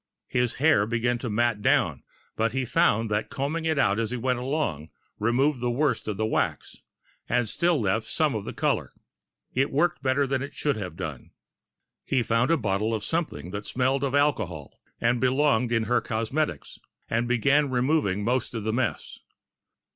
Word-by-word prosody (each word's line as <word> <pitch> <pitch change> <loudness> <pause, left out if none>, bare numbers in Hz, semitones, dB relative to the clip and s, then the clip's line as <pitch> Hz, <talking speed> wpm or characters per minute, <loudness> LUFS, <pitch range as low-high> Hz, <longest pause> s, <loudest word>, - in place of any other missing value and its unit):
His 125 -1 0
hair 140 -8 +3
began 120 +1 0
to 120 - -4
mat 115 0 +1
down, - - +2 0.3
but 115 +1 0
he 135 -1 -1
found 115 -3 +2
that 105 +1 -1
combing 155 +4 -2
it 160 -2 +1
out 100 -5 +2
as 115 -2 -1
he 125 - -3
went 125 +1 0
along 125 - -2 0.3
removed 125 +5 +2
the 120 - 0
worst 140 +1 0
of 105 -2 -2
the 110 - 0
wax 110 - -1 0.5
and 120 -1 +1
still 170 +8 +1
left 110 +1 0
some 155 -4 +1
of 110 -3 -3
the - - -5
color. - - -1 0.6
It 135 +2 +1
worked 155 +4 +1
better 135 +1 +2
than 135 -1 -1
it 140 +1 -6
should 145 -2 0
have 95 -4 -6
done. - - -6 0.7
He 130 -3 +1
found 115 +3 +1
a 165 - +4
bottle 105 -1 0
of 105 - -4
something 110 - -3
that 100 +1 -5
smelled 130 +2 0
of 140 0 0
alcohol 110 - 0 0.2
and 120 0 +1
belonged 130 -2 +2
in 115 -1 +2
her 120 +2 +1
cosmetics, 115 - -2 0.3
and 115 +1 0
began 140 +4 +3
removing 125 -6 +1
most 120 +2 -1
of 110 - -3
the 110 0 -1
mess. 120 -2 -2
120 Hz, 180 wpm, -26 LUFS, 110-140 Hz, 0.7 s, a